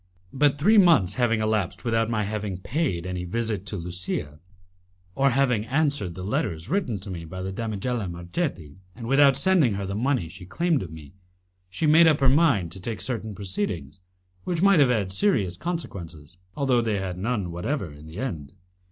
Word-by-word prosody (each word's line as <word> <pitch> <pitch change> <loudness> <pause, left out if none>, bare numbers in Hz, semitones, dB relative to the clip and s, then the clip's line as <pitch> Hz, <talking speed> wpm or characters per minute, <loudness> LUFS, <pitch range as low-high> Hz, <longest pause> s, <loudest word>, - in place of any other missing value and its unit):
But 145 +1 +3
three 210 +9 +5
months 155 - +5
having 115 -2 +1
elapsed 110 -1 -1
without 115 -1 +1
my 110 -2 0
having 105 -2 -3
paid 100 - -2
any 90 -1 -3
visit 105 +1 -2
to 105 - -2
Lusia, 85 -4 -4 0.7
or 135 +5 +3
having 125 -4 +2
answered 140 - 0
the 90 - -6
letters 85 -4 -2
written 180 - 0
to 100 0 -7
me 85 -2 -5
by 95 +3 -7
the 95 - -3
damigella 110 0 -3
Marchetti, 85 - -4 0.2
and 115 - -8
without 135 +2 +5
sending 150 - +3
her 100 0 -3
the 95 - -4
money 120 -3 0
she 90 +2 -11
claimed 170 - +1
of 90 - -6
me, 75 -2 -11 0.6
she 155 - -2
made 160 +2 +7
up 155 -2 +4
her 135 -2 +4
mind 135 - +3
to 95 - -9
take 110 0 -4
certain 110 +1 -4
proceedings 95 -5 -4 0.4
which 175 -1 -1
might 195 -4 +6
have 140 -3 +5
had 105 -6 0
serious 100 - +1
consequences, 85 - -6 0.2
although 130 -4 +2
they 110 -3 0
had 90 -2 -4
none 100 -4 -2
whatever 90 - -3
in 75 +2 -13
the 80 +3 -10
end. 80 - -4
105 Hz, 185 wpm, -25 LUFS, 90-135 Hz, 0.7 s, made